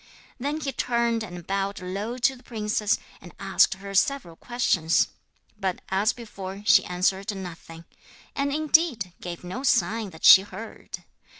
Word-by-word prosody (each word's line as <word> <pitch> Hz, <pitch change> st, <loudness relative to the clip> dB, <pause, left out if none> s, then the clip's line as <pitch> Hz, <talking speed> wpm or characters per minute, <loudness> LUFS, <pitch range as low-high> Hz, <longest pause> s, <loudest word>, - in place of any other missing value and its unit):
Then 290 Hz, +4 st, -2 dB
he 275 Hz, -, -2 dB
turned 235 Hz, -2 st, 0 dB
and 175 Hz, -4 st, -8 dB
bowed 195 Hz, +1 st, -2 dB
low 200 Hz, +6 st, -4 dB
to 265 Hz, +2 st, +2 dB
the 250 Hz, -, -17 dB
princess, 215 Hz, -3 st, -1 dB, 0.2 s
and -, -, -13 dB
asked -, -, +3 dB
her 195 Hz, +1 st, -9 dB
several 195 Hz, -4 st, +1 dB
questions; 180 Hz, -8 st, +1 dB, 0.5 s
but, 190 Hz, -3 st, -2 dB
as 200 Hz, +4 st, +2 dB
before, 200 Hz, -4 st, -8 dB
she -, -, +6 dB
answered 190 Hz, +3 st, -1 dB
nothing, 165 Hz, -2 st, -9 dB, 0.5 s
and, 280 Hz, 0 st, 0 dB
indeed, 300 Hz, -, +2 dB
gave 175 Hz, -1 st, -7 dB
no 180 Hz, +9 st, -5 dB
sign 230 Hz, -5 st, +1 dB
that 160 Hz, -3 st, -7 dB
she 190 Hz, -, +11 dB
heard. 215 Hz, +3 st, -9 dB
205 Hz, 145 wpm, -25 LUFS, 185-240 Hz, 0.5 s, she